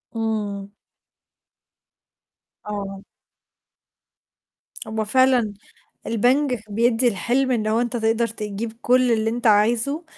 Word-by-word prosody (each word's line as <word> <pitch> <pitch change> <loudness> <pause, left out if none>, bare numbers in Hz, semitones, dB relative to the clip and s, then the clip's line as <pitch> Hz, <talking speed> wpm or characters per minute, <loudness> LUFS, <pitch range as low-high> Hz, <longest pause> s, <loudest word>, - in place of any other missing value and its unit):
إمم. 210 -3 -3 2.0
آه. 200 -1 -5 1.8
هو 220 0 -2
فعلًا 250 -2 +3 0.5
البنك 250 +3 +1
بيدّي 235 +3 +2
الحلم، 250 +5 0
إن 215 -3 0
هو 225 +2 +2
أنت 240 0 -2
تقدر 225 +1 +1
تجيب 215 0 -5
كلّ 250 0 +3
اللي 220 -1 +1
أنت 235 +1 -1
عايزه، 230 +9 +2
225 Hz, 95 wpm, -22 LUFS, 210-245 Hz, 2.0 s, فعلًا